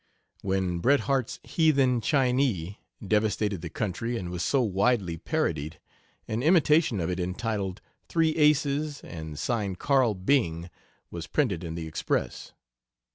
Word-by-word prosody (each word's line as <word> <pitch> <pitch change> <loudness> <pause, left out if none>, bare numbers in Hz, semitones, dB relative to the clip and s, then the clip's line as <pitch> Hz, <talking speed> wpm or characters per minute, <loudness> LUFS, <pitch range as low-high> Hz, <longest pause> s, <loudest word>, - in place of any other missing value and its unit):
When 95 -2 -1
Bret 140 +9 +3
Harte's 135 -4 -1
"Heathen 135 -7 +2
Chinee" 125 - +1 0.3
devastated 105 -2 +1
the 85 - -5
country, 115 +6 -3
and 90 -5 -5
was 90 -1 -4
so 140 - +2
widely 100 -3 +1
parodied, 80 -1 -2 0.5
an 110 +2 -2
imitation 155 - +4
of 85 +1 -1
it 90 - -3
entitled, 95 +1 -3 0.3
"Three 165 -1 +2
Aces," 150 -1 +2
and 80 -3 -8
signed 100 - -2
"Carl 130 -5 +2
Byng," 90 -5 0 0.4
was 85 -1 -6
printed 100 - 0
in 80 -1 -5
the 85 -1 -5
Express. 80 0 -3
105 Hz, 130 wpm, -27 LUFS, 90-135 Hz, 0.5 s, imitation